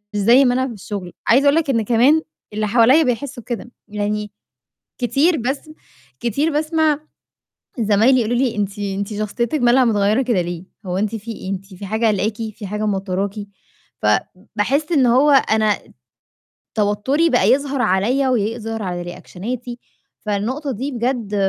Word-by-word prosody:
زي 235 +7 +5
ما 245 - +3
أنا 260 +1 +1
في 235 - -6
الشُغل. 195 -3 -7
عايزة 265 +5 +5
أقول 285 +2 +5
لك 325 -3 +1
إن 230 -3 +1
كمان 250 +8 +4 0.3
اللي 215 0 -1
حواليّا 245 +8 +5
بيحسّوا 250 0 -3
كده، 240 0 -6 0.2
يعني 210 0 -3 0.7
كتير 285 +7 +2
بسم 270 +5 -3 0.5
كتير 285 +8 0
باسمع 310 0 +1 0.8
زمايلي 225 +4 +4
يقولوا 235 +2 0
لي: 250 -4 0
"أنتِ 205 0 -2
أنتِ 200 +1 -3
شخصيتِك 235 +7 -2
مالها 245 +2 +5
متغيّرة 215 +2 +2
كده 235 -7 +1
ليه، 175 +1 -6 0.2
هو 180 +1 -2
أنتِ 210 +2 -1
في 225 +2 -7
إيه، 190 -2 -7
أنتِ 195 0 -6
في 195 +2 -8
حاجة 220 +3 0
قالقاكِ، 210 +1 0 0.2
في 205 - -8
حاجة 210 +2 -3
موتّراكِ؟" 195 0 -2 0.7
فباحس 210 - -1
إن 270 -5 +4
هو 260 +5 +4
أنا 220 -6 +3 1.0
توتّري 220 +10 +1
بقى - - +3
يظهر 275 -1 +1
عليّا 245 +9 +2
ويظهر 225 +1 -3
على 175 -1 -3
رِيأكشَناتي، 240 +7 -7 0.4
فالنقطة 240 +8 -2
دي 265 +5 -4
بجد 235 -4 -2
230 Hz, 150 wpm, -20 LUFS, 205-265 Hz, 1.0 s, زي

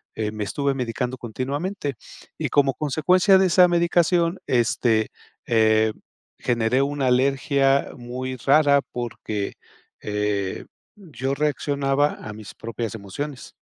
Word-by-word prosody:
eh, 105 -1 -2
me 105 -1 -4
estuve 140 +6 -1
medicando 125 0 -3
continuamente. 140 - -3 0.5
Y - - -1
como 135 -2 +3
consecuencia 180 - +3
de 190 - +4
esa 180 +1 +6
medicación, 170 0 +2
este, 115 -2 +2 0.4
eh, 110 -1 +3 0.5
generé 120 +1 +1
una 140 0 -1
alergia 135 +2 +2
muy 130 +1 -5
rara 140 +2 +4
porque, 110 -4 -4 0.5
eh, 105 -2 -2 0.3
yo 140 -7 -4
reaccionaba 145 0 0
a 105 - -6
mis 105 -2 -11
propias 115 0 -5
emociones. 125 +8 -7
135 Hz, 115 wpm, -23 LUFS, 115-145 Hz, 0.5 s, esa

